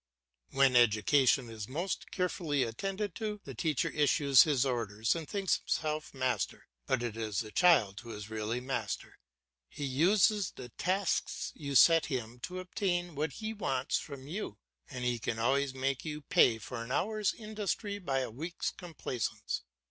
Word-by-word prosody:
When 135 Hz, -1 st, +4 dB
education 120 Hz, +3 st, +4 dB
is 110 Hz, -2 st, -6 dB
most 170 Hz, +9 st, -3 dB
carefully 170 Hz, -7 st, 0 dB
attended 195 Hz, -, -3 dB
to, 210 Hz, -2 st, -3 dB
the 135 Hz, -, -8 dB
teacher 150 Hz, +4 st, 0 dB
issues 140 Hz, -2 st, +5 dB
his 140 Hz, -4 st, +3 dB
orders 115 Hz, -3 st, 0 dB
and 165 Hz, -3 st, -5 dB
thinks 195 Hz, -3 st, +1 dB
himself 155 Hz, -1 st, -2 dB
master, 130 Hz, -2 st, -2 dB, 0.2 s
but 120 Hz, -, +1 dB
it 115 Hz, -3 st, -3 dB
is 110 Hz, -4 st, -2 dB
the 110 Hz, -2 st, -8 dB
child 110 Hz, -, +4 dB
who 120 Hz, -1 st, -9 dB
is 105 Hz, -1 st, -7 dB
really 110 Hz, +2 st, -2 dB
master. 125 Hz, -6 st, -4 dB, 0.5 s
He 145 Hz, -, -5 dB
uses 190 Hz, -, +3 dB
the 125 Hz, -1 st, -8 dB
tasks 185 Hz, -, -1 dB
you 140 Hz, -2 st, -5 dB
set 165 Hz, +3 st, +7 dB
him 125 Hz, -4 st, -4 dB
to 180 Hz, +8 st, -5 dB
obtain 180 Hz, -2 st, -1 dB
what 150 Hz, +1 st, -2 dB
he 220 Hz, 0 st, -4 dB
wants 135 Hz, -11 st, -1 dB
from 140 Hz, -2 st, -9 dB
you, 155 Hz, -, -5 dB, 0.3 s
and 125 Hz, -, -5 dB
he 120 Hz, -1 st, 0 dB
can 110 Hz, -, -2 dB
always 135 Hz, +3 st, +1 dB
make 135 Hz, 0 st, -1 dB
you 150 Hz, -1 st, -5 dB
pay 140 Hz, -9 st, +4 dB
for 115 Hz, +2 st, -6 dB
an 115 Hz, -, -8 dB
hour's 210 Hz, +6 st, 0 dB
industry 210 Hz, -1 st, -3 dB
by 135 Hz, -8 st, -1 dB
a 130 Hz, -, -4 dB
week's 165 Hz, +9 st, -3 dB
complaisance. 150 Hz, -, -4 dB
140 Hz, 165 wpm, -32 LUFS, 120-175 Hz, 0.5 s, set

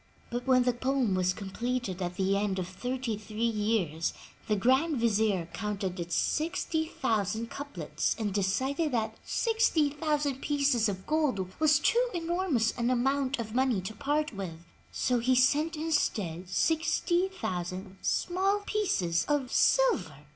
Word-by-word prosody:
But 245 Hz, +2 st, -4 dB
when 255 Hz, -1 st, +5 dB
the 250 Hz, 0 st, +2 dB
poem 255 Hz, -3 st, 0 dB
was 185 Hz, 0 st, +2 dB
completed 205 Hz, +1 st, -3 dB
at 175 Hz, 0 st, -3 dB
the 195 Hz, +1 st, +1 dB
end 200 Hz, -1 st, 0 dB
of 180 Hz, -2 st, -2 dB
thirty 245 Hz, +4 st, -3 dB
three 215 Hz, +2 st, -5 dB
years, 210 Hz, -8 st, 0 dB, 0.3 s
the 215 Hz, -, +2 dB
Grand 265 Hz, +9 st, +2 dB
Vizier 215 Hz, -6 st, +1 dB
counted 200 Hz, -4 st, -3 dB
its 170 Hz, 0 st, -2 dB
60,000 235 Hz, -, -1 dB
couplets 170 Hz, -, -3 dB
and 210 Hz, -4 st, -2 dB
decided 260 Hz, -, 0 dB
that 220 Hz, -2 st, -1 dB
60,000 300 Hz, -, +1 dB
pieces 280 Hz, -6 st, +2 dB
of 190 Hz, -1 st, -5 dB
gold 260 Hz, -, 0 dB
was 310 Hz, -1 st, +5 dB
too 465 Hz, +11 st, +3 dB
enormous 335 Hz, -9 st, +1 dB
an 235 Hz, -, +1 dB
amoimt 270 Hz, +2 st, +1 dB
of 220 Hz, -2 st, -5 dB
money 255 Hz, -4 st, +2 dB
to 190 Hz, +4 st, -6 dB
part 295 Hz, +5 st, -1 dB
with, 170 Hz, -4 st, -7 dB, 0.3 s
so 250 Hz, -1 st, +1 dB
he 255 Hz, +2 st, +2 dB
sent 295 Hz, +6 st, +3 dB
instead 205 Hz, -, -1 dB
60,000 205 Hz, -, -1 dB
small 390 Hz, +3 st, +1 dB
pieces 185 Hz, -, 0 dB
of 285 Hz, -4 st, 0 dB
silver. 180 Hz, -, +2 dB
240 Hz, 135 wpm, -29 LUFS, 195-295 Hz, 0.3 s, when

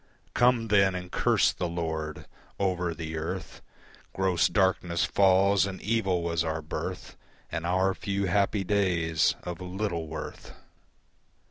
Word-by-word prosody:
Come 120 Hz, -2 st, +3 dB
then 100 Hz, -2 st, +4 dB
and 90 Hz, 0 st, -6 dB
curse 60 Hz, -, +3 dB
the 90 Hz, +3 st, -2 dB
Lord. 80 Hz, -2 st, -4 dB, 0.3 s
Over 90 Hz, -3 st, 0 dB
the 80 Hz, 0 st, -5 dB
earth 80 Hz, +1 st, -5 dB, 0.5 s
Gross 90 Hz, -2 st, +2 dB
darkness 95 Hz, -3 st, +1 dB
falls, 95 Hz, 0 st, +4 dB
and 95 Hz, -1 st, -6 dB
evil 95 Hz, -5 st, 0 dB
was 85 Hz, -1 st, 0 dB
our 80 Hz, -1 st, -3 dB
birth 75 Hz, -, -5 dB, 0.4 s
And 85 Hz, 0 st, -3 dB
our 95 Hz, +2 st, +2 dB
few 100 Hz, 0 st, -2 dB
happy 100 Hz, +2 st, +1 dB
days 90 Hz, -5 st, +1 dB
of 90 Hz, 0 st, -6 dB
little 90 Hz, -3 st, -3 dB
worth. 80 Hz, +1 st, -7 dB
90 Hz, 130 wpm, -28 LUFS, 85-95 Hz, 0.5 s, then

